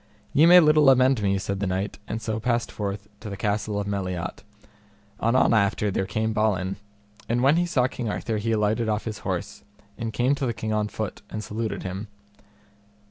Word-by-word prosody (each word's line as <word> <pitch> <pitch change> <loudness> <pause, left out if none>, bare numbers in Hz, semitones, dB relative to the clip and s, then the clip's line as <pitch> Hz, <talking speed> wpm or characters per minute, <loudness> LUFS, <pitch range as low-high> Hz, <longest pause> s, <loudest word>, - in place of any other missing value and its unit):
Ye 155 +4 +6
may 180 +1 +9
little 150 -3 +6
amend 130 -2 +4
me, 100 -1 +1
said 95 0 -3
the 100 - -1
knight, 95 +3 -2
and 115 0 -4
so 110 0 -2
passed 120 +1 0
forth 100 0 -4
to 110 - -7
the 100 - -6
castle 105 0 -1
of 100 - -2
Meliot. 95 -3 -3 0.8
Anon 120 +1 +3
after 105 -1 +2
there 95 0 -1
came 110 +2 -1
Balin, 100 -3 0 0.5
and 120 +2 +1
when 140 +3 +5
he 175 0 +1
saw 130 -7 +2
King 125 -3 -3
Arthur 110 +1 -2
he 110 +2 -1
alighted 110 +1 +1
off 105 0 -1
his 110 -1 -5
horse, - - -4 0.4
and 115 -1 -3
came 125 +5 +2
to 135 -2 -1
the 120 - -2
King 110 0 -3
on 105 0 0
foot, 110 0 -5
and 110 - -5
saluted 110 0 -4
him. 95 +3 -5
110 Hz, 195 wpm, -25 LUFS, 100-120 Hz, 0.8 s, may